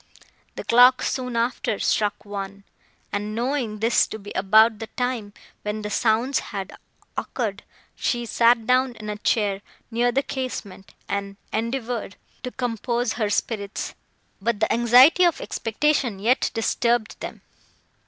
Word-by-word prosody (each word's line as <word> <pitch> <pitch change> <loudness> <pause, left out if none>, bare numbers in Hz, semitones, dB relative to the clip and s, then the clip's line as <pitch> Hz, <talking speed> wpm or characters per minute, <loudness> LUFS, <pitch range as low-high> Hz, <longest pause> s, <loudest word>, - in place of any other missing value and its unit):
The - - -5
clock 250 +2 +6
soon 250 -2 -2
after 230 -2 0
struck 210 0 0
one, 200 -1 -6 0.5
and, 210 +1 -3
knowing 235 -3 -2
this 230 +2 +3
to - - -6
be 205 -1 -10
about 215 +3 +4
the 225 - -5
time, 245 -5 -3 0.3
when 210 +1 -4
the 210 - -4
sounds 235 +5 +2
had 195 -1 -6 0.4
occurred, - - -3 0.3
she 240 -1 -1
sat 230 0 +3
down 255 +1 +2
in 215 -1 -6
a 210 - -5
chair, 205 -3 +1 0.3
near 240 +2 +2
the 275 +3 +1
casement, 245 -9 -6
and 200 0 -3 0.2
endeavoured 230 -2 -2 0.3
to 250 - -4
compose 240 -1 -2
her 215 -3 -1
spirits; 205 -1 -2 0.5
but 225 0 0
the 220 - +2
anxiety 245 +9 +6
of 345 -3 +3
expectation 245 -1 0
yet 235 +7 +2
disturbed 235 0 0
them. - - -7
230 Hz, 140 wpm, -24 LUFS, 210-245 Hz, 0.5 s, clock